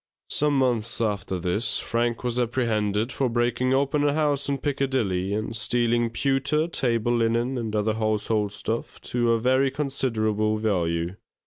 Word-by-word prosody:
Some 150 Hz, -1 st, +2 dB
months 120 Hz, -4 st, +1 dB
after 100 Hz, -4 st, -1 dB
this, 90 Hz, +6 st, 0 dB
Frank 120 Hz, 0 st, -1 dB
was 125 Hz, 0 st, -1 dB
apprehended 110 Hz, -2 st, 0 dB
for 135 Hz, -3 st, 0 dB
breaking 120 Hz, +2 st, 0 dB
open 140 Hz, +2 st, +1 dB
a 145 Hz, -1 st, +2 dB
house 145 Hz, -2 st, 0 dB
in 140 Hz, -, 0 dB
Piccadilly 130 Hz, -10 st, -1 dB
and 110 Hz, +1 st, -3 dB
stealing 120 Hz, 0 st, +1 dB
pewter, 135 Hz, +5 st, +1 dB
table 120 Hz, -7 st, 0 dB
linen, 115 Hz, +3 st, +1 dB
and 115 Hz, -3 st, -3 dB
other 105 Hz, +1 st, +1 dB
household 110 Hz, -1 st, 0 dB
stuff 110 Hz, +2 st, -4 dB
to 120 Hz, -1 st, 0 dB
a 115 Hz, -, +2 dB
very 130 Hz, +3 st, +3 dB
considerable 110 Hz, -7 st, 0 dB
value. 90 Hz, -4 st, -1 dB
115 Hz, 145 wpm, -25 LUFS, 110-130 Hz, -, very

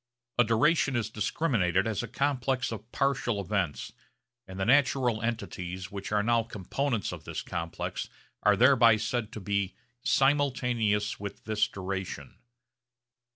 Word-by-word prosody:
A -, -, +8 dB
duration 135 Hz, +5 st, +3 dB
is 110 Hz, -2 st, -1 dB
discriminated 105 Hz, -, +1 dB
as 110 Hz, -4 st, -1 dB
a -, -, -5 dB
complex 135 Hz, -3 st, 0 dB
of 110 Hz, +1 st, -8 dB
partial 125 Hz, -6 st, 0 dB
events, 100 Hz, -5 st, -2 dB, 0.5 s
and 95 Hz, 0 st, -8 dB
the 95 Hz, -, 0 dB
natural 125 Hz, -2 st, +3 dB
entities 95 Hz, -4 st, -4 dB
which 100 Hz, 0 st, -6 dB
are 115 Hz, +3 st, +2 dB
components 115 Hz, +2 st, -2 dB
of -, -, -8 dB
this -, -, -5 dB
complex 85 Hz, -1 st, -4 dB, 0.3 s
are 105 Hz, -1 st, +4 dB
thereby 120 Hz, -2 st, +6 dB
said 110 Hz, 0 st, -2 dB
to -, -, -5 dB
be 100 Hz, 0 st, -1 dB, 0.3 s
'simultaneous 125 Hz, -7 st, +2 dB
with 100 Hz, -1 st, -7 dB
this 110 Hz, -1 st, +1 dB
duration.' 95 Hz, 0 st, -5 dB
110 Hz, 130 wpm, -29 LUFS, 100-125 Hz, 0.5 s, A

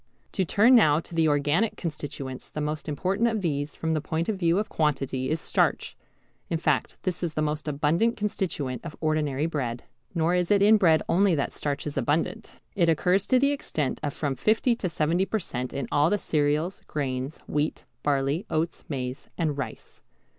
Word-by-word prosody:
To 190 Hz, -, 0 dB
turn 210 Hz, +8 st, +4 dB
now 155 Hz, -11 st, +6 dB
to 170 Hz, -, -11 dB
the 165 Hz, -1 st, +3 dB
organic 150 Hz, +8 st, +2 dB
constituents. 140 Hz, -5 st, -6 dB
The -, -, -6 dB
most 150 Hz, +1 st, -3 dB
important 190 Hz, +9 st, +1 dB
of 220 Hz, -3 st, -1 dB
these 145 Hz, -3 st, -2 dB
from 160 Hz, 0 st, -1 dB
the 155 Hz, -, 0 dB
point 165 Hz, +3 st, -2 dB
of 215 Hz, -, +1 dB
view 170 Hz, -2 st, +2 dB
of 210 Hz, -, 0 dB
quantity 135 Hz, -4 st, -1 dB
is 160 Hz, -, 0 dB
starch, -, -, 0 dB, 0.5 s
in 165 Hz, -, 0 dB
fact 160 Hz, -, 0 dB
this 180 Hz, -3 st, -2 dB
is 170 Hz, -3 st, -2 dB
the 155 Hz, -, 0 dB
most 150 Hz, 0 st, -2 dB
abundant 155 Hz, +10 st, +1 dB
constituent 165 Hz, -, -2 dB
of 170 Hz, -2 st, -7 dB
ordinary 155 Hz, -2 st, 0 dB
bread. 130 Hz, -7 st, -3 dB, 0.3 s
Nor 165 Hz, +1 st, +2 dB
is 180 Hz, -1 st, +1 dB
it 200 Hz, -1 st, +4 dB
in 215 Hz, +2 st, +7 dB
bread 165 Hz, -6 st, +4 dB
only 190 Hz, 0 st, +3 dB
that 140 Hz, -, -1 dB
starch 145 Hz, -1 st, -3 dB
is 150 Hz, -, -4 dB
abundant. 165 Hz, +9 st, 0 dB, 0.3 s
It 170 Hz, -4 st, +3 dB
occurs 180 Hz, +5 st, +2 dB
to 255 Hz, -, +4 dB
the 280 Hz, +2 st, +3 dB
extent 155 Hz, -, -2 dB
of 145 Hz, -, -1 dB
from 145 Hz, -3 st, -1 dB
50 225 Hz, -, +2 dB
to 210 Hz, -6 st, -2 dB
70 165 Hz, +3 st, +1 dB
per 220 Hz, -, 0 dB
cent. 125 Hz, -, -4 dB
in 140 Hz, -4 st, -3 dB
all 145 Hz, +2 st, +4 dB
the 205 Hz, -, +2 dB
cereals, 155 Hz, +2 st, 0 dB
grains, 135 Hz, 0 st, -3 dB
wheat, 150 Hz, +1 st, -1 dB, 0.2 s
barley, 140 Hz, -, 0 dB
oats, 160 Hz, +2 st, -1 dB
maize, 130 Hz, -2 st, -4 dB
and 155 Hz, -4 st, 0 dB
rice. 130 Hz, -6 st, -7 dB
155 Hz, 190 wpm, -26 LUFS, 145-185 Hz, 0.5 s, in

